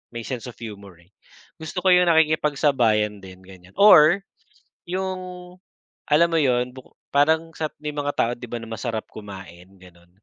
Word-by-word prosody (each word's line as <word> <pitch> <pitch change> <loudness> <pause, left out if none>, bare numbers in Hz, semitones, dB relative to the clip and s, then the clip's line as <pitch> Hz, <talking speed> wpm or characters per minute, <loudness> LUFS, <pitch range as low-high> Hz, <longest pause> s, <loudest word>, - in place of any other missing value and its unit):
may 115 - -5
sense 125 -1 -6
of 120 - -9
humor, 100 -5 -10
eh, 90 - -31 0.5
gusto 170 +3 -6
ko 185 - +4
yung 180 0 +5
nakikipagsabayan 140 -9 +2
din 95 0 -13
ganyan. 95 0 -16
Or 195 -2 +6 0.6
yung, 185 +1 -3 0.9
alam 170 +3 +4
mo 165 - +2
yun? 125 -3 +1
Buko 130 -1 -15 0.2
parang 160 +3 +2
sa, 155 - -3 0.2
may 150 0 -4
mga 145 0 -2
tao, 115 - +1
'di 125 0 -10
ba 120 - -4
na 115 - -8
masarap 110 -1 -4
kumain? 95 -4 -11
Gano'n. 85 -1 -19
125 Hz, 165 wpm, -23 LUFS, 105-160 Hz, 0.9 s, Or